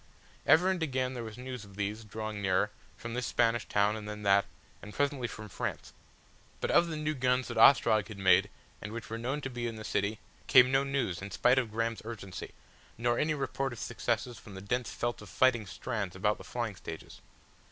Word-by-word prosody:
Ever 170 +6 +6
and 185 -3 -2
again 130 -4 0
there 120 -2 -5
was 110 0 -8
news 125 -2 -6
of 100 -1 -14
these, 105 +2 -3
drawing 110 0 -5
nearer, 95 +2 +2 0.3
from 115 0 -6
this 125 0 -2
Spanish 115 -1 +1
town 105 +1 +2
and 105 -1 -6
then 105 0 -6
that, 100 0 +4 0.4
and 105 - -10
presently 140 -3 0
from 110 -2 -8
France. 95 - -5 0.7
But - - -1
of 170 - +5
the 160 -2 -4
new 155 0 -1
guns 125 -1 +1
that - - -4
Ostrog 110 -6 +6
had 110 -3 -9
made 95 +1 +4 0.3
and 105 - -6
which 115 -1 -7
were 115 - -3
known 135 +5 -2
to 135 - -4
be 120 -1 -3
in 115 - -4
the 110 - -7
city 100 +1 -1 0.3
came 130 0 +7
no 135 +1 +4
news 135 -11 -1
in 100 - -6
spite 125 +7 +4
of 120 -4 -2
Graham's 115 +1 -2
urgency, 100 -5 -7 0.4
nor 120 +1 +1
any 155 0 +1
report 135 -2 -2
of 120 - -9
successes 115 +1 -2
from 100 - -12
the - - -6
dense 125 +5 -1
felt 120 -1 -2
of 105 - -11
fighting 120 +2 +3
strands 100 -3 -4
about 105 +3 +1
the - - -9
flying 120 -4 -3
stages. 80 -3 -9
115 Hz, 215 wpm, -31 LUFS, 105-130 Hz, 0.7 s, came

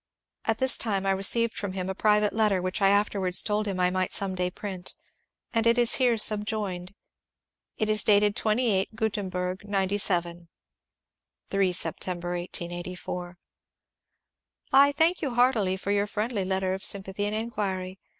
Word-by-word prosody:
At 225 -1 +1
this 260 +1 +1
time 200 -4 -1
I 195 - +2
received 220 +4 +1
from 200 -2 -4
him 185 -1 -3
a 190 - -2
private 210 +1 +2
letter 215 -4 +2
which 185 +2 -3
I 195 - +5
afterwards 200 -2 +2
told 210 0 -1
him 190 -2 -3
I 180 0 +3
might 185 0 -1
some 195 -1 -1
day 180 -1 -1
print, 185 -1 -7 0.6
and 230 -1 +2
it 230 +1 +4
is 240 -1 +3
here 245 -3 +3
subjoined: 205 -3 -1 0.8
it 215 - 0
is 215 -1 +1
dated 205 -1 +3
23 215 -2 +1
Gutemberg 190 -4 -2
97 190 -4 -1 1.0
(3 195 -2 +2
Sept. 180 - -1
1884): 175 0 -5 0.6
— - - -37
I 280 +1 +7
thank 320 +5 +2
you 270 -6 -2
heartily 230 -7 +2
for 200 +1 -3
your 205 0 +1
friendly 210 -1 -2
letter 190 0 0
of 190 0 -5
sympathy 195 +1 0
and 210 - -2
inquiry. 195 -4 -3
200 Hz, 155 wpm, -27 LUFS, 185-215 Hz, 1.0 s, I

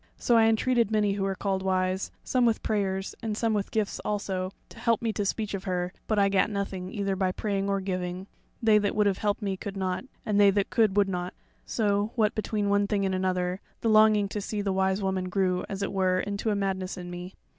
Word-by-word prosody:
So 240 - +2
I 225 -1 +6
entreated 235 +1 +2
many 210 -2 +2
who 200 - -3
were 195 0 0
called 190 0 -1
wise, 185 0 0
some 255 -1 +1
with 230 -2 +2
prayers, 195 -2 -1
and 215 -2 -3
some 225 -1 +1
with 205 -2 -1
gifts 215 -2 -1
also, 190 -3 -2 0.2
to - - -13
help 230 0 +2
me 225 -2 -1
to 205 - -1
speech 210 +1 -2
of 195 -1 -4
her; 180 0 -2
but 215 - +1
I 200 -1 +5
gat 195 0 +2
nothing 195 -3 -4
either 200 -2 -1
by 190 -1 +1
praying 200 0 -2
or 195 0 +1
giving; 185 -1 -3 0.4
they 215 -1 +6
that 205 -1 -1
would 210 -1 +3
have 195 -2 +1
helped 210 +1 -1
me 195 -2 -1
could 195 +1 -6
not, 185 +4 -2 0.2
and 205 -1 +1
they 200 - +7
that 200 0 0
could 215 -3 +3
would 200 -1 +5
not. 180 -1 -3 0.3
So, 205 0 0
what 215 -2 +2
between 215 -1 -1
one 200 0 +2
thing 200 -1 0
and 190 - 0
another, 185 0 -1 0.2
the 225 - +1
longing 215 -1 +5
to 210 - -3
see 205 0 -3
the 195 -1 0
Wise 190 +1 +1
Woman 190 -1 -1
grew 185 -1 0
as 195 0 -3
it 200 - -3
were 185 -1 +2
into 200 +3 -2
a 210 - +1
madness 190 -1 -2
in 175 -1 -7
me. 180 +1 -7
200 Hz, 235 wpm, -27 LUFS, 190-210 Hz, 0.4 s, they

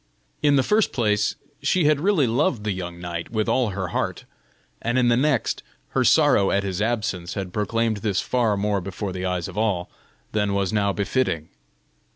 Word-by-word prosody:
In 145 -1 +4
the 135 - +4
first 210 +6 +2
place, 105 -4 +1 0.3
she 185 - +2
had 150 -1 +4
really 185 -6 +3
loved 125 - +1
the 105 - -1
young 90 -2 -5
knight 85 -1 -5
with 110 -2 -1
all 125 -4 +2
her 95 -2 -3
heart, - - -2 0.6
and 120 +2 0
in 125 -1 +4
the 120 - +4
next, 135 -1 +1 0.3
her - - +1
sorrow 100 - +4
at 100 - +1
his 95 0 -3
absence 105 -6 -1
had 95 -3 -4
proclaimed 115 +1 0
this 100 -2 0
far 115 -5 +1
more 100 0 0
before 95 +1 -5
the 95 0 -3
eyes 90 -2 -2
of 95 +2 -5
all, 100 -6 0 0.4
than 105 -2 0
was 100 -1 0
now 100 -1 +2
befitting. 100 - -1
105 Hz, 190 wpm, -23 LUFS, 95-120 Hz, 0.6 s, In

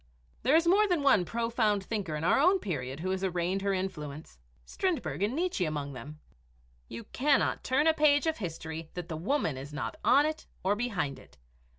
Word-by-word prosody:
There 265 +6 +3
is 330 +1 +4
more 400 +5 +5
than 350 -6 +1
one 235 -10 +4
profound 225 0 0
thinker 195 -7 -3
of 150 - -4
our 175 - +4
own 365 +7 +5
period 140 - -4
who 185 +2 -1
has 190 0 -2
arraigned 180 +1 -1
her 200 0 0
influence 155 - -5 0.3
Strindberg 315 - -2
and 210 +6 0
Nietzsche 345 - 0
among 145 -3 -3
them. 145 +5 -9 0.7
You 115 0 -7
cannot 280 +1 +2
turn 270 +4 +2
a 320 - +5
page 295 -1 +4
of 320 -1 0
history 160 -3 -6
that 175 -2 -6
the 160 - -3
woman 165 - -1
is 140 +2 -8
not 150 - -4
on 280 +3 +5
it 310 +1 -4 0.2
or 195 +2 +2
behind 200 - -2
it. - - -19
195 Hz, 195 wpm, -30 LUFS, -, 0.7 s, more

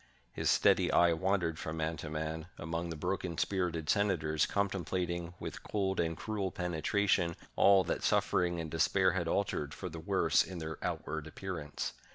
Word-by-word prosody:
His - - 0
steady - - +4
eye 85 -1 +5
wandered 85 -2 0
from 80 +1 -4
man 80 +1 -1
to 75 +1 -6
man 80 +1 -3
among 85 +2 -3
the 80 - -4
broken 90 +1 -2
spirited 85 -5 -1
senators, 80 -7 +2
contemplating, 90 -3 -2
with - - -6
cold 95 -2 -1
and 80 -1 0
cruel 100 -4 -2
penetra 90 +4 -1
tion, 85 -3 +2 0.2
all 100 -1 +6
that - - -2
suffering 85 -1 +2
and 80 -2 -5
despair 95 +3 +3
had 85 -1 -1
altered 75 -6 -1
for 95 - -5
the 80 0 -7
worse 80 - +3
in 95 - -4
their 80 -2 -5
outward 80 -1 -3
appearance. 80 -3 -5
85 Hz, 170 wpm, -33 LUFS, 80-95 Hz, 0.2 s, all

